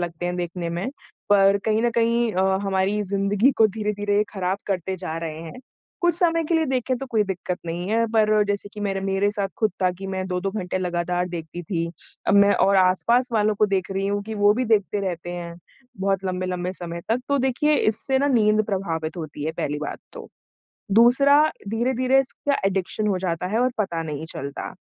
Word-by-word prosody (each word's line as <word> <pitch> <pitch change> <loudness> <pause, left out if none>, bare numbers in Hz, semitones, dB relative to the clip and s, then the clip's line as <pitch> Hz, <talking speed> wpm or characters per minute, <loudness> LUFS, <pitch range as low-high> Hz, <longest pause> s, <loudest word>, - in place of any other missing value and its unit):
लगते 175 0 -3
हैं 180 0 -2
देखने 175 0 -3
में। 175 +9 -3 0.4
पर 200 0 +5
कहीं 220 +1 +1
न 240 - +2
कहीं 235 -1 +1
अ, 190 +1 +2
हमारी 195 +1 0
ज़िंदगी 200 +4 +2
को 220 - +6
धीरे-धीरे 205 -1 0
ख़राब 190 0 -1
करते 190 -1 -2
जा 170 -3 -5
रहे 160 -1 -5
हैं। 165 +10 -9 0.4
कुछ 345 -1 +3
समय 330 -1 +2
के 330 +2 0
लिए 320 - +3
देखे 260 -1 0
तो 270 +2 -6
कोई 220 -3 +3
दिक्कत 185 -2 -4
नहीं 175 +3 -4
है। 230 +1 +2
पर 215 -1 +4
जैसे 205 0 -2
कि 210 - -8
मेरे 195 -1 -1
मेरे 195 +1 +1
साथ 200 -1 -2
खुद 220 -2 +2
था 185 - +4
कि 195 - -6
मैं 190 -1 -3
2-2 185 +1 -1
घंटे 185 -3 -3
लगातार 180 0 -1
देखती 170 0 -6
थी। 170 -1 -2 0.4
अब - - +3
मैं 200 0 +6
और 195 +1 +3
आस-पास 195 +7 +3
वालों 215 -1 +2
को 210 +1 +3
देख 195 -2 -1
रही 195 0 -1
हूँ 205 0 -1
कि 220 +1 -5
वो 205 0 +4
भी 255 +3 0
देखते 210 -3 +1
रहते 175 -2 -4
हैं 170 -1 -6 0.5
बहुत 195 -1 0
लंबे-लंबे 185 -1 -2
समय 170 -2 -6
तक। 230 +3 +1
तो 280 0 +2
देखिए 265 +4 +2
इससे 265 +4 +2
ना 280 - +2
नींद 215 -4 +3
प्रभावित 165 -5 -3
होती 155 -3 -6
है 160 - -1
पहली 150 -2 -3
बात 150 - -5
तो। - - -9 0.6
दूसरा 265 +7 +6 0.3
धीरे-धीरे 255 +4 +2
इसका 275 +1 -2
एडिक्शन 195 +2 -1
हो 195 -3 +1
जाता 180 -1 -2
है 210 +5 -1
और 255 +1 +2
पता 175 -6 -1
नहीं 155 -1 -5
चलता। 140 +1 -6
195 Hz, 205 wpm, -23 LUFS, 180-220 Hz, 0.6 s, को